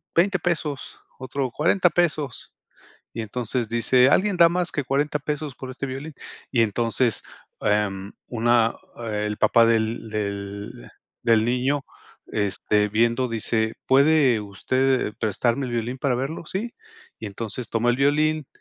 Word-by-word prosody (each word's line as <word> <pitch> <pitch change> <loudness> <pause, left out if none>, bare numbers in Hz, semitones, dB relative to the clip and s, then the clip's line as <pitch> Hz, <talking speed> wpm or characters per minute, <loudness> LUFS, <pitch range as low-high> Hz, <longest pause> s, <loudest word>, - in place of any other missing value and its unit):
$20 195 +3 +3
pesos, 155 -5 -3 0.2
otro, 130 0 -3
$40 175 - +3
pesos". 155 -7 -1 0.6
Y 115 - -2
entonces 120 +1 -3
dice: 125 +3 +4
"¿Alguien 195 +2 +2
da 170 -1 +7
más 180 0 -1
que 145 - -2
$40 145 +3 0
pesos 150 -1 -4
por 130 - -8
este 140 +2 -5
violín?". 135 +4 -6 0.4
Y 120 - +3
entonces, 115 +2 0 0.4
em, 100 -1 0 0.2
una 120 -1 +2 0.4
el 105 0 -2
papá 115 0 +5
del 115 0 0
del 100 -1 -5 0.3
del 115 -1 +4
niño, 130 +4 0 0.4
este, 105 0 0
viendo, 115 +4 +2
dice: 110 0 -1
"¿Puede 135 -4 +4
usted 130 +4 0
prestarme 120 +5 0
el - - -5
violín 120 +2 -2
para 130 -3 +1
verlo?". 140 +6 -4
Sí. 220 +8 -4 0.5
Y 110 - -5
entonces, 110 +3 -5
toma 115 +1 +1
el 120 - 0
violín, 150 +1 +2
125 Hz, 140 wpm, -24 LUFS, 110-145 Hz, 0.6 s, da